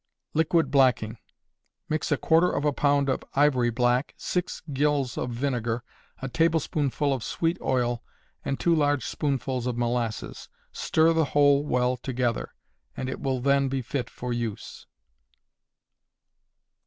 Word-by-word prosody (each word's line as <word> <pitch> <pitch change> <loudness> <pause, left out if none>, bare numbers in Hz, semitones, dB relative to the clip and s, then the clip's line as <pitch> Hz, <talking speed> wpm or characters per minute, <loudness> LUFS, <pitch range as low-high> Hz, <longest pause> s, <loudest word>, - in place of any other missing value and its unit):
Liquid 160 -2 +2
Blacking. 125 -5 +3 0.7
Mix 155 0 -2
a - - +3
quarter 165 +2 +3
of 145 - -1
a 145 - +2
pound 140 0 +2
of 130 - -1
ivory 135 -4 +3
black, 120 +3 +1
six 180 0 -3
gills 140 -2 +1
of 125 - -2
vinegar, 120 -2 -2 0.4
a - - -1
tablespoonful 150 -2 +1
of 130 -4 -3
sweet 165 +1 0
oil, 120 -2 0 0.4
and 135 - -2
two 170 - +3
large 145 -5 +2
spoonfuls 130 -3 -2
of 120 -1 -2
molasses. 120 -2 -2 0.2
Stir 160 +1 +2
the 160 -1 +2
whole 145 0 +5
well 125 -3 +1
together, 125 -2 -2 0.4
and 130 - -3
it - - -5
will 130 -2 -1
then 140 +1 +2
be 135 -1 -2
fit 125 0 -3
for 125 +1 -5
use. 115 -3 -5
135 Hz, 140 wpm, -26 LUFS, 120-145 Hz, 0.7 s, whole